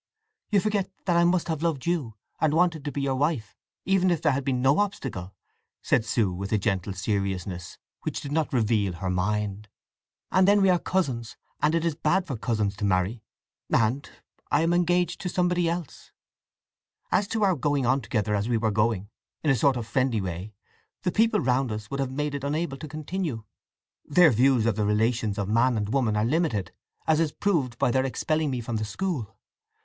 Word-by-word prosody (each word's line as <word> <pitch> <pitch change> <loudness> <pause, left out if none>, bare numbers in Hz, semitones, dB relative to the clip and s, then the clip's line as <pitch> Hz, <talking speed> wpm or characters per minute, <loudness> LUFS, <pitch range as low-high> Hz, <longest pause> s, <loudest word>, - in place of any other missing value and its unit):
"You 205 - +4
forget 205 -2 -1
that 175 -3 +2
I 170 - +5
must 175 0 +2
have 160 -3 -2
loved 165 -6 -1
you, 155 -11 -1 0.2
and 155 -1 +2
wanted 165 -3 +2
to 145 - -2
be 140 - -3
your 135 -1 +1
wife, 130 -6 -1 0.3
even 190 -1 +3
if 170 -3 +1
there 150 - +2
had 140 +1 -1
been 130 -2 0
no 135 +6 +3
obstacle," 135 - -3 0.5
said 110 - +2
Sue, 110 -4 +1
with 95 +2 -5
a 110 - +3
gentle 95 -1 -1
seriousness 95 -3 -3 0.2
which - - -3
did 140 - -7
not 155 0 0
reveal 110 -6 +1
her 90 +2 -3
mind. 105 +2 -2 0.6
"And 185 0 +4
then 205 0 +5
we 190 - +5
are 180 - +3
cousins, 130 -13 -2 0.2
and 150 +2 +3
it 165 0 0
is 165 - +1
bad 175 +5 +1
for 140 - -4
cousins 105 -3 -1
to - - -6
marry. 100 +3 +1 0.5
And—I 125 +6 -1
am 165 +1 +2
engaged 175 0 +1
to 180 - -2
somebody 175 -1 +1
else. 170 -3 -5 1.0
As 195 +2 +2
to 220 0 -1
our 195 -2 +4
going 145 -1 0
on 130 +3 +2
together 105 -1 -1
as 105 +3 0
we 120 - +2
were 110 -1 0
going, 105 -2 +1 0.4
in 150 - +3
a - - +4
sort 130 +2 +3
of 115 - -4
friendly 125 +1 +1
way, 95 +2 -5 0.5
the 180 - +1
people 220 +2 +3
round 125 0 +1
us 105 +1 -6
would 140 - -3
have 135 -2 0
made 150 +2 -2
it 140 -1 -4
unable 145 0 -2
to 155 +3 -7
continue. 155 - -4 0.6
Their 165 +1 +5
views 125 0 +3
of 115 -3 +2
the 105 - +1
relations 110 0 +1
of 100 -2 -1
man 115 +3 +3
and 105 0 -2
woman 120 -6 +1
are 105 - +2
limited, 135 - 0 0.3
as 160 -1 +3
is 160 -2 +1
proved 150 - 0
by 130 -2 +2
their 130 +2 +2
expelling 155 +3 0
me 125 -2 -2
from 115 0 -3
the 110 - -2
school. 150 - -3
130 Hz, 200 wpm, -26 LUFS, 110-165 Hz, 1.0 s, I